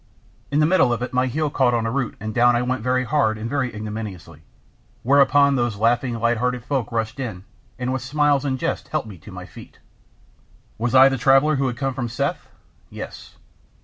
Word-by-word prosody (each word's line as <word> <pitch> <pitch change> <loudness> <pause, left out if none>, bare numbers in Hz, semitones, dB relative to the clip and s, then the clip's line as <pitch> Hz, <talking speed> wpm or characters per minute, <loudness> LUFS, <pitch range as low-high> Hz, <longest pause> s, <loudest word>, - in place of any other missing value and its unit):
In 145 - -1
the 155 - +4
middle 160 -7 +3
of 120 0 -1
it 125 - -5
my 130 +1 +2
heel 150 +3 -1
caught 130 -4 +2
in 115 -1 -1
a 115 - -1
root 130 -3 -2
and 110 +1 -5
down 120 +1 +4
I 120 - +1
went 130 +1 -2
very 125 +2 +1
hard 125 -5 +1
and 110 +1 -5
very 130 -1 -1
ignominiously, 105 -7 -7 0.6
whereon 140 +1 +4
those 120 -4 0
laughing, 120 +3 +1
light 115 +1 +1
hearted 125 0 -1
folk 135 -5 -2
rushed 115 +2 -3
in, 110 -8 -5 0.3
and 125 0 -2
with 130 - -2
smiles 145 +1 +1
and 135 -2 -1
jests - - -3
helped - - -2
me 95 -5 -11
to - - -13
my - - -8
feet. - - -14 1.0
"Was 120 +2 0
I 130 +1 +9
the 135 -1 -1
traveller 135 +4 +4
who 135 0 +1
had 120 -1 -4
come 135 0 -2
from 125 -3 -4
Seth?" - - -3 0.4
"Yes." - - -9
125 Hz, 210 wpm, -22 LUFS, 115-135 Hz, 1.0 s, I